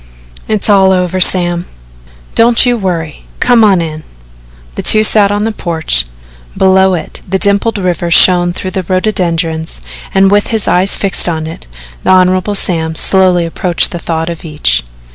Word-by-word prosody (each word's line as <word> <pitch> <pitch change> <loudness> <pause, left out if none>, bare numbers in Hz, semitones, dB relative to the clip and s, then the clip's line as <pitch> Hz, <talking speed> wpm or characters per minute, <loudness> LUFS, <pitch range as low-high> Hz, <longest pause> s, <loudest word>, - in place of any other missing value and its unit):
"It's 215 -2 -2
all 195 -2 +3
over, 185 0 -1
Sam." 175 -1 +1 0.7
"Don't 235 +2 +3
you 245 -1 +1
worry 170 -8 -5
come 245 -2 +3
on 195 -4 +3
in." 155 -1 -7 0.7
The - - -5
two 215 0 +4
sat 210 -2 +4
on 205 +1 -2
the 225 - -1
porch. 160 - -1 0.5
Below 190 0 +3
it 165 - -8
the 190 - 0
dimpled 200 +3 0
river 175 -3 -2
shone 175 +1 +4
through 185 +1 -6
the 190 - -3
rhododendrons 170 -4 -2 0.3
and 195 0 +2
with 205 0 +1
his 220 -3 -1
eyes 185 +2 +2
fixed 195 -2 +2
on 160 -2 -4
it, 160 - -10 0.4
the - - -2
Hon. 185 +2 +2
Sam 160 -4 0
slowly 185 -1 +3
approached 170 +2 0
the 175 - -6
thought 165 -1 -4
of 165 - -9
each. 150 - -1
185 Hz, 160 wpm, -10 LUFS, 170-200 Hz, 0.7 s, two